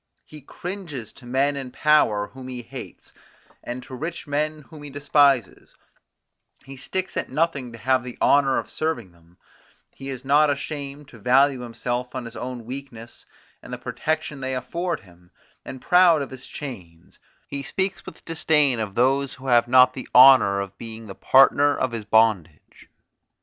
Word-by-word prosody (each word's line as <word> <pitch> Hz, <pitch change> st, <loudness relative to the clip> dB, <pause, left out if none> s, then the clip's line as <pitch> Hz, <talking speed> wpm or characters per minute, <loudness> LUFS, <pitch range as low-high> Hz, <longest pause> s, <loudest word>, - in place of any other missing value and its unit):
He 155 Hz, -1 st, -13 dB
cringes 170 Hz, -, -7 dB
to 125 Hz, -, -15 dB
men 135 Hz, +3 st, +1 dB
in 135 Hz, -2 st, -5 dB
power 125 Hz, -8 st, +2 dB
whom 130 Hz, -1 st, -11 dB
he 125 Hz, -1 st, -7 dB
hates, -, -, -10 dB, 0.5 s
and 125 Hz, +1 st, -6 dB
to -, -, -12 dB
rich 160 Hz, +6 st, -5 dB
men 150 Hz, +1 st, -2 dB
whom 155 Hz, +1 st, -14 dB
he 145 Hz, -, -9 dB
despises; 140 Hz, -2 st, +1 dB, 0.9 s
he 135 Hz, -, -10 dB
sticks 185 Hz, +8 st, -4 dB
at -, -, -3 dB
nothing 150 Hz, -6 st, -1 dB
to 115 Hz, -, -10 dB
have 130 Hz, +3 st, +1 dB
the 125 Hz, -1 st, -9 dB
honour 140 Hz, -1 st, +3 dB
of -, -, -3 dB
serving 120 Hz, -, -3 dB
them; 85 Hz, +1 st, -25 dB, 0.5 s
he 135 Hz, 0 st, -9 dB
is 130 Hz, -1 st, -7 dB
not 145 Hz, +2 st, +4 dB
ashamed 145 Hz, 0 st, -5 dB
to 115 Hz, -, -15 dB
value 135 Hz, +4 st, +3 dB
himself 120 Hz, +1 st, -4 dB
on 130 Hz, -2 st, -4 dB
his 115 Hz, 0 st, -9 dB
own 125 Hz, -2 st, -6 dB
weakness 125 Hz, -2 st, -9 dB, 0.3 s
and -, -, -12 dB
the -, -, -4 dB
protection 155 Hz, -2 st, -3 dB
they 130 Hz, 0 st, -3 dB
afford 170 Hz, +6 st, -3 dB
him; 90 Hz, -1 st, -21 dB, 0.3 s
and 130 Hz, -, -9 dB
proud 175 Hz, -4 st, +5 dB
of 135 Hz, -, -9 dB
his 130 Hz, -1 st, -10 dB
chains, 90 Hz, -, -10 dB, 0.3 s
he 140 Hz, -, -5 dB
speaks 190 Hz, +6 st, -3 dB
with -, -, -12 dB
disdain 150 Hz, -6 st, +2 dB
of 105 Hz, -3 st, -4 dB
those 135 Hz, +2 st, +1 dB
who 130 Hz, -, -14 dB
have 120 Hz, -2 st, +3 dB
not 130 Hz, 0 st, +6 dB
the 130 Hz, -, -8 dB
honour 125 Hz, -7 st, +7 dB
of 100 Hz, 0 st, -7 dB
being 115 Hz, -1 st, -9 dB
the 100 Hz, -, -8 dB
partner 140 Hz, +5 st, +4 dB
of 130 Hz, -, -1 dB
his 115 Hz, -3 st, -5 dB
bondage. 105 Hz, -8 st, 0 dB
130 Hz, 170 wpm, -23 LUFS, 120-145 Hz, 0.9 s, honour